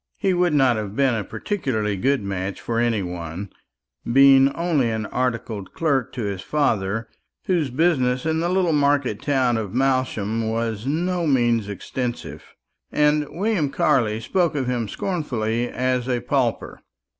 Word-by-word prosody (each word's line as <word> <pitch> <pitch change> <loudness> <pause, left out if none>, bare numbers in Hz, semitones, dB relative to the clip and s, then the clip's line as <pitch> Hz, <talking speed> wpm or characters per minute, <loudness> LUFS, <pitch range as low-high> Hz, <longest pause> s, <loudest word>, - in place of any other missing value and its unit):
He 195 -3 +1
would 175 -3 +2
not 130 -5 +4
have 105 -1 -5
been 135 -1 +3
a 110 -2 -1
particularly 110 - -2
good 130 +4 +1
match 95 0 -4
for 115 -1 -2
any 115 -4 +1
one, 90 +2 -6 0.6
being 135 +1 +6
only 165 -8 +1
an 110 -1 -2
articled 115 -5 -3
clerk 140 -7 0
to 125 - -4
his 100 -2 -3
father, 110 -6 0 0.4
whose 170 -7 +1
business 130 -3 +1
in 160 0 +1
the 170 +1 0
little 180 -3 +2
market 140 -6 +1
town 130 -5 +1
of 110 -1 -4
Malsham 120 -5 0
was 115 -1 -2
by - - -1
no 175 +1 -1
means 120 -6 +2
extensive; 120 +5 -5 0.5
and 150 0 +2
William 190 -5 0
Carley 110 -5 +1
spoke 170 +6 0
of 135 -3 -1
him 120 -3 -1
scornfully 120 - -2
as 130 0 -1
a 125 -1 +1
pauper. 125 -2 -1
125 Hz, 155 wpm, -22 LUFS, 110-150 Hz, 0.6 s, being